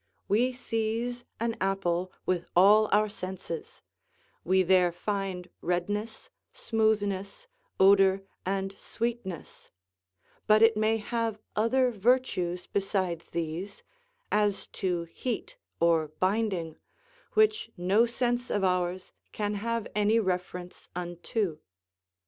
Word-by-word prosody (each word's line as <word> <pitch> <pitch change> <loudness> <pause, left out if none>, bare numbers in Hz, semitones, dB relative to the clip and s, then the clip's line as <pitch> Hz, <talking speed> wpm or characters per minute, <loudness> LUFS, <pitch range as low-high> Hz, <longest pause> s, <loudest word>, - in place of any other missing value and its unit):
We 240 +5 +3
seize 240 0 -2
an 230 0 -1
apple 185 -2 0
with 175 -2 0
all 210 +4 +6
our 210 +1 +4
senses; 185 -4 -7 0.6
we 185 +1 +3
there 180 -1 +4
find 190 0 -3
redness, 205 +6 -2 0.2
smoothness, 215 - 0 0.3
odour, 195 0 +5 0.2
and 195 +1 -2
sweetness; 230 -8 -5 0.8
but 215 +1 +6
it 225 -1 +6
may 215 +1 +2
have 225 0 -2 0.2
other 250 +4 +3
virtues 200 -6 +1
besides 190 -4 -2
these, 170 +4 -4 0.5
as 210 -1 +1 0.2
to 180 -3 0
heat 245 - -5 0.2
or 165 -2 +3
binding, 185 0 -1 0.6
which 430 0 +3
no 195 +7 +3
sense 240 +1 -1
of 205 - 0
ours 180 0 0 0.2
can 210 -1 -2
have 230 +2 -2
any 210 +2 +3
reference 180 -2 -3
unto. 175 0 -3
200 Hz, 105 wpm, -29 LUFS, 180-225 Hz, 0.8 s, all